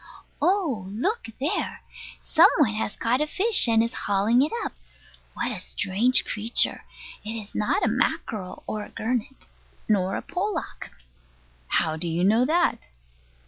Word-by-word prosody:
Oh, 330 - +1
look 305 - -2
there! 285 +5 -2 0.4
some - - +6
one 265 -10 +3
has 215 0 -3
caught 245 +4 0
a 300 - +1
fish, 400 - +4
and 225 -1 +4
is 230 - -3
hauling 205 +5 +2
it 295 - +1
up. - - -4 0.6
What - - -2
a - - -4
strange 190 - +2
creature! 220 +3 0 0.4
It 215 +2 -5
is 210 -1 -11
not 210 - 0
a - - +2
mackerel, 220 -4 -2
nor 215 -1 -3
a - - -11
gurnet, 235 +3 -4 0.4
nor 195 -3 +1
a - - -4
pollock. 380 +4 -4 0.8
How 160 - +1
do 170 +2 -3
you 170 +2 -1
know 220 +6 +4
that? 335 - +1
225 Hz, 150 wpm, -25 LUFS, 205-280 Hz, 0.8 s, some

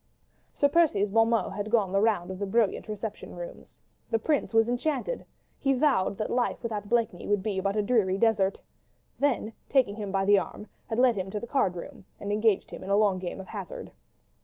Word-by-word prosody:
Sir 285 - +2
Percy's 280 -11 +3
bon 225 +1 +4
mot 230 -1 +1
had 205 +1 -4
gone 215 -5 +2
the 195 +1 +2
round 205 -5 +1
of 190 - -7
the 200 - -2
brilliant 220 +1 +1
reception 215 0 -6
rooms. - - -9 0.3
The 225 - +2
Prince 290 +5 0
was 225 0 +4
enchanted. 285 - -2 0.3
He 275 -1 +2
vowed 255 -8 +2
that 215 - -3
life 245 0 0
without 210 -3 -4
Blakeney 230 -7 0
would 205 -2 +1
be 200 -3 -1
but 195 +1 -1
a 210 - +1
dreary 200 -4 +2
desert. 200 -3 +2 0.6
Then, 250 -6 0 0.2
taking 245 -7 +2
him 205 -3 -4
by 195 0 +1
the 200 0 +6
arm, 190 +3 -7 0.2
had 225 - -2
led 250 -1 +4
him 190 0 -3
to 210 - -3
the 235 - -6
card 235 -8 +1
room, 170 - -9
and 205 - -4
engaged 215 -1 +2
him - - -8
in 190 - -7
a 200 - +4
long 205 -3 +3
game 180 +1 -5
of 190 - -9
hazard. 195 -5 -7
215 Hz, 210 wpm, -28 LUFS, 195-235 Hz, 0.6 s, the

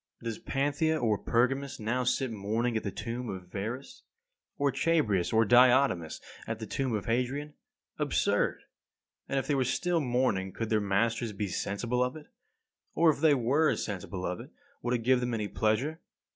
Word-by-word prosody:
37. - - -12
Does 115 -2 -4
Panthea 145 +3 +1
or 110 -3 +2
Pergamus 135 +3 0
now 120 +4 0
sit 130 0 0
mourning 110 +3 -1
at 110 - +1
the 100 - -3
tomb 115 +4 -5
of 90 -2 -7
Verus, 125 - -5 0.6
or 140 -1 +2
Chabrias 130 - +1
or 115 0 +4
Diotimus 120 - +4 0.3
at 115 - -2
the 110 - -6
tomb 130 +1 -1
of 105 - -3
Hadrian? 130 +5 -1 0.5
Absurd! - - +1 0.7
And 135 - 0
if 135 - 0
they 150 - 0
were 135 -2 +2
still 175 +7 0
mourning 120 -8 0
could 115 0 -4
their 110 -1 +3
masters 115 +3 0
be 100 +1 -2
sensible 120 +7 -1
of 125 +2 -2
it? 155 -1 -10 0.7
Or 165 -1 +5
if 145 - -6
they 155 -3 +5
were 140 +6 +2
sensible 95 -2 -4
of 90 0 -3
it, - - -10 0.3
would 120 +1 0
it 115 - -3
give 130 +1 +4
them 125 -1 -1
any 105 -2 -2
pleasure? 125 +12 0
120 Hz, 180 wpm, -30 LUFS, 110-135 Hz, 0.7 s, Or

